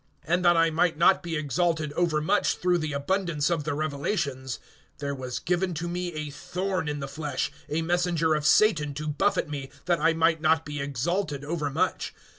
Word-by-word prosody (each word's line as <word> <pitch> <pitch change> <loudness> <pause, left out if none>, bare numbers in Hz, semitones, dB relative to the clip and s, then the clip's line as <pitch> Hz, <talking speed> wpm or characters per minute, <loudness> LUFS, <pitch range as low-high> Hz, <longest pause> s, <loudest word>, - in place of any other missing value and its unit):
(7)And 175 +3 +2
that 175 -1 +5
I 165 0 +4
might 165 0 +2
not 185 +3 +5
be 170 -2 -4
exalted 155 +1 0
overmuch 170 +3 +1
through 180 -1 +2
the 155 -1 -2
abundance 155 +1 0
of 160 -4 0
the 150 -2 -1
revelations, 140 - -2 0.4
there 140 -1 -3
was 130 -2 -4
given 180 +1 0
to 170 +3 -3
me 175 0 -3
a 155 -1 -4
thorn 185 +3 -3
in 145 -1 -3
the 140 - -3
flesh, 145 +1 -3 0.2
a 160 +2 0
messenger 170 -2 +1
of 150 -1 0
Satan 150 -6 +4
to 155 +1 -4
buffet 155 +5 +1
me, 140 -2 -5 0.2
that 175 -2 +2
I 165 +1 +4
might 165 0 +2
not 160 0 +3
be 150 -1 -4
exalted 145 +2 -2
overmuch. 150 -3 -1
160 Hz, 185 wpm, -27 LUFS, 145-175 Hz, 0.4 s, that